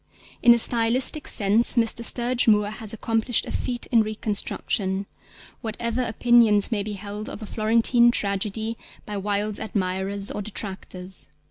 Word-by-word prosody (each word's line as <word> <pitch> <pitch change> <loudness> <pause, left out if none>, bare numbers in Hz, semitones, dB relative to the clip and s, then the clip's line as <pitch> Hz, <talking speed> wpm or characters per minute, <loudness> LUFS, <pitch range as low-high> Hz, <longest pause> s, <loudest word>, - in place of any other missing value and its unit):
In 240 - +7
a - - +1
stylistic 240 +6 +2
sense 215 +5 +2
Mr. 235 0 +1
Sturge 240 +1 +2
Moore 210 -1 +3
has 215 -1 -6
accomplished 225 +1 0
a - - -7
feat 245 -1 -3
in 230 -2 +5
reconstruction, 205 -2 -2 0.6
whatever 235 +2 -3
opinions 230 -2 +3
may 215 -3 0
be 210 +1 -5
held 205 +2 -7
of 220 - -8
A - - -5
Florentine 230 +3 +3
Tragedy 215 +1 -2 0.3
by 210 - -6
Wilde's 205 +1 -1
admirers 195 -1 -2
or - - -4
detractors. 190 -4 -7
215 Hz, 140 wpm, -24 LUFS, 200-235 Hz, 0.6 s, In